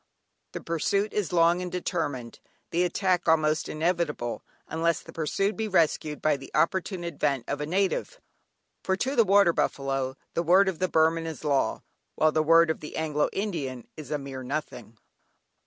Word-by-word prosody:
The - - -5
pursuit 195 +5 -1
is 205 -6 -1
long 170 +1 +3
and 180 -1 -5
determined, 145 -9 -3 0.3
the 175 +2 +2
attack 180 0 0
almost 155 -1 +2
inevitable, 155 -6 -1 0.3
unless 165 +1 0
the - - -13
pursued 195 +6 -1
be 220 0 -2
rescued 160 -5 +1
by 155 -2 +3
the 135 -1 -11
opportune 185 +1 0
advent 145 -6 -1
of 140 +1 -3
a 150 - -3
native, 195 - -1 0.6
for 190 0 0
to 265 +7 -1
the 230 - +6
water 200 -4 +5
buffalo 135 -2 -1 0.2
the - - 0
word 185 +4 +5
of 190 -4 -2
the 185 - +1
Burman 165 +1 +2
is 160 -1 -7
law, 140 -3 0 0.3
while 155 0 +3
the 155 - +2
word 165 +1 +5
of - - -5
the 150 - -8
Anglo 150 -2 0
Indian 150 - -4
is 155 -2 -9
a 150 - 0
mere 135 -2 -7
nothing. 130 -4 -5
165 Hz, 170 wpm, -27 LUFS, 150-180 Hz, 0.6 s, the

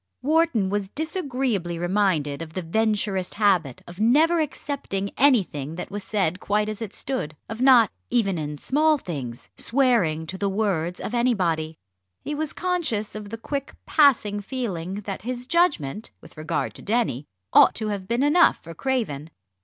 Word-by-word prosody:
Wharton 300 - +2
was 205 -2 -1
disagreeably 255 - -2
reminded 175 -5 0
of 160 -1 -7
the 185 - -3
Venturist 205 0 0
habit 185 - +1
of 175 +2 -12
never 310 +10 +4
accepting 275 -10 -3
anything 185 - +2
that 180 - -6
was 205 0 -4
said 185 -4 0
quite 210 +1 0
as 215 +1 -5
it 220 -4 -4
stood 210 - -4
of 225 +2 -6
not, 255 -5 +6 0.2
even 200 -8 +1
in 150 -1 -4
small 305 - +2
things, 135 - -6
"swearing 230 - +2
to 190 +4 -6
the 200 - 0
words" 190 -4 -1
of - - -5
anybody. 175 -10 0 0.5
He 295 - -3
was 300 0 -2
conscious 320 - -2
of 210 -1 -7
the 225 - -5
quick 275 +4 -5
passing 235 -9 +4
feeling 195 -6 -4
that 195 -1 -5
his 245 +3 -4
judgment, 250 - +1
with - - -16
regard 155 0 -2
to - - -8
Denny, 205 - -1 0.3
ought - - +7
to 215 -1 -2
have 200 -2 -4
been 235 +5 +1
enough 300 +5 +5
for 165 - -11
Craven. 165 - -2
210 Hz, 160 wpm, -24 LUFS, 175-255 Hz, 0.5 s, ought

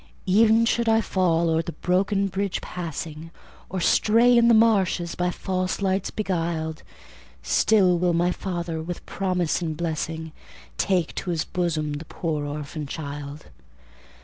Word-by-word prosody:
Ev'n 220 +4 +5
should 235 0 +1
I 225 0 +4
fall 170 -5 +1
o'er 160 0 +2
the 165 0 -6
broken 195 +2 +1
bridge 195 0 -2
passing, 160 -2 -6 0.4
Or 190 - -3
stray 230 +7 +4
in 235 0 +5
the 235 - +6
marshes, 195 -6 +3
by 180 0 0
false 185 0 -2
lights 195 -1 0
beguiled, 165 -5 -2 0.6
Still 185 - +3
will 175 0 +2
my 175 +2 +2
Father, 170 -4 -4
with 175 +2 -6
promise 180 -3 -1
and 160 -3 -3
blessing, 160 -1 -3 0.5
Take 180 -5 +1
to 185 - -6
His 165 -2 -1
bosom 165 -4 -1
the 145 +3 -6
poor 155 -3 -3
orphan 150 +1 -5
child. 145 0 -7
175 Hz, 145 wpm, -24 LUFS, 160-195 Hz, 0.6 s, the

